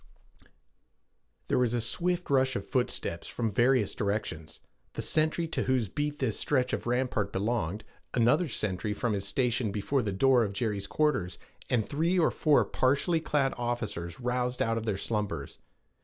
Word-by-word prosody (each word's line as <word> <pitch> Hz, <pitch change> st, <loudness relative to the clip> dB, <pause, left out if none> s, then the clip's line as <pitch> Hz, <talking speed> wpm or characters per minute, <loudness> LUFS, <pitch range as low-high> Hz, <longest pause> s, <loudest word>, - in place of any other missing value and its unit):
There -, -, +2 dB
was 120 Hz, -1 st, +2 dB
a -, -, +1 dB
swift 175 Hz, +9 st, -1 dB
rush 130 Hz, -1 st, +3 dB
of -, -, -3 dB
footsteps 120 Hz, -9 st, -2 dB
from 115 Hz, -3 st, -2 dB
various 125 Hz, +5 st, +3 dB
directions: 100 Hz, -8 st, -3 dB, 0.3 s
the -, -, -4 dB
sentry 160 Hz, +2 st, +1 dB
to -, -, -1 dB
whose 125 Hz, -6 st, +1 dB
beat 145 Hz, +7 st, -2 dB
this 130 Hz, -7 st, -1 dB
stretch 130 Hz, -3 st, +1 dB
of -, -, -2 dB
rampart 120 Hz, -5 st, 0 dB
belonged, 105 Hz, -1 st, -1 dB, 0.3 s
another 125 Hz, +9 st, +3 dB
sentry 105 Hz, -4 st, -2 dB
from 115 Hz, +1 st, -1 dB
his 100 Hz, -1 st, -2 dB
station 120 Hz, 0 st, 0 dB
before 110 Hz, +7 st, 0 dB
the 105 Hz, -4 st, -2 dB
door 125 Hz, +5 st, +4 dB
of 100 Hz, -2 st, -3 dB
Jerry's 100 Hz, -2 st, -2 dB
quarters, 150 Hz, -13 st, 0 dB, 0.3 s
and 115 Hz, -4 st, +1 dB
three 165 Hz, +5 st, +1 dB
or 170 Hz, -, +4 dB
four 150 Hz, -2 st, +3 dB
partly 140 Hz, +6 st, +1 dB
clad 145 Hz, -4 st, +1 dB
officers 105 Hz, -9 st, -3 dB
roused 125 Hz, 0 st, -1 dB
out 115 Hz, 0 st, +1 dB
of 115 Hz, -, -7 dB
their 100 Hz, -3 st, 0 dB
slumbers. 105 Hz, 0 st, -3 dB
120 Hz, 160 wpm, -29 LUFS, 105-135 Hz, 0.3 s, door